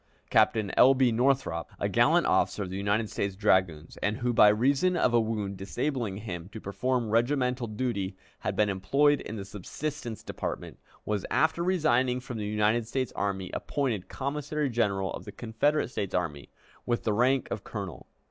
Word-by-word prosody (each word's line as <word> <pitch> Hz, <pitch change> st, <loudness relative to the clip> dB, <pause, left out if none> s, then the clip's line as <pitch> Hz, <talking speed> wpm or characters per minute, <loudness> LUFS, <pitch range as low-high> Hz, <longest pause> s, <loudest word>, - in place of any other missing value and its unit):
Captain 105 Hz, -4 st, +3 dB
L. 135 Hz, +2 st, +7 dB
B. 130 Hz, -2 st, +3 dB
Northrop, 120 Hz, -, +1 dB
a -, -, 0 dB
gallant -, -, +3 dB
officer 105 Hz, -, +2 dB
of 90 Hz, -, -6 dB
the -, -, -4 dB
United 100 Hz, +3 st, 0 dB
States 100 Hz, -1 st, -3 dB
Dragoons, 95 Hz, -6 st, +1 dB
and 105 Hz, +1 st, -1 dB
who, 120 Hz, 0 st, 0 dB
by 105 Hz, -, +7 dB
reason 140 Hz, +11 st, +2 dB
of 125 Hz, -, +2 dB
a 120 Hz, -, +5 dB
wound 105 Hz, -3 st, -2 dB
disabling 110 Hz, +1 st, -2 dB
him 90 Hz, -4 st, -6 dB
to 110 Hz, -, -8 dB
perform 120 Hz, +3 st, -1 dB
regimental 125 Hz, +1 st, +1 dB
duty, 105 Hz, -4 st, -3 dB, 0.2 s
had -, -, -3 dB
been 105 Hz, -, +3 dB
employed 140 Hz, +10 st, +2 dB
in 110 Hz, -, -6 dB
the 100 Hz, -3 st, -6 dB
subsistence 115 Hz, -, -6 dB
department, -, -, -5 dB, 0.3 s
was, 105 Hz, -2 st, -1 dB
after 160 Hz, +2 st, +2 dB
resigning 130 Hz, -9 st, +2 dB
from 125 Hz, -2 st, -6 dB
the 105 Hz, -, -3 dB
United 105 Hz, +2 st, +1 dB
States 130 Hz, +1 st, -2 dB
Army, 95 Hz, -2 st, -2 dB
appointed 125 Hz, -10 st, -2 dB
Commissary 145 Hz, +1 st, -2 dB
General 100 Hz, -5 st, 0 dB
of -, -, -7 dB
the -, -, -8 dB
Confederate 120 Hz, +6 st, 0 dB
States 100 Hz, -6 st, -3 dB
Army, 80 Hz, -6 st, -2 dB, 0.3 s
with 120 Hz, -1 st, -1 dB
the 110 Hz, -, +1 dB
rank 125 Hz, +4 st, +2 dB
of 100 Hz, -, -3 dB
colonel. 95 Hz, -, -7 dB
110 Hz, 175 wpm, -28 LUFS, 100-130 Hz, 0.3 s, L